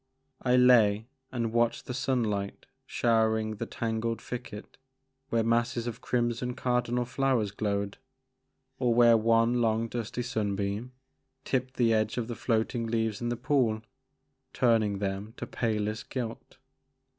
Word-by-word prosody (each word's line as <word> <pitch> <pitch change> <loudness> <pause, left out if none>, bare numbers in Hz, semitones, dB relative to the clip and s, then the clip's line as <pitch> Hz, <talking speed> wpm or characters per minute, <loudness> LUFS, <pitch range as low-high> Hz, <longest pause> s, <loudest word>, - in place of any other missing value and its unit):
I 125 -1 +3
lay 115 -4 +5 0.3
and 115 -3 -2
watched 120 0 +1
the 125 - -4
sunlight 115 -6 -1 0.2
showering 110 -2 +1
the - - -4
tangled 115 0 -2
thicket 120 -2 -8 0.5
where 115 -1 +2
masses 115 +1 +1
of 120 -2 -5
crimson 120 0 -1
Cardinal 125 -1 0
flowers 125 -4 0
glowed, 100 +1 -2 0.8
or 120 -3 +2
where 120 -1 +7
one 115 +2 +3
long 115 0 +1
dusty 120 +1 -4
sunbeam 105 0 -2 0.5
tipped 130 0 -1
the 115 -2 +3
edge 110 +1 +1
of 120 -2 -1
the 120 - -4
floating 115 0 0
leaves 110 -2 -1
in 120 - -1
the 120 - -2
pool, 120 -4 +1 0.7
turning 110 -4 +2
them 100 +3 -4
to - - -4
palest 110 -2 -2
gilt. 120 -3 -5
115 Hz, 135 wpm, -29 LUFS, 110-120 Hz, 0.8 s, where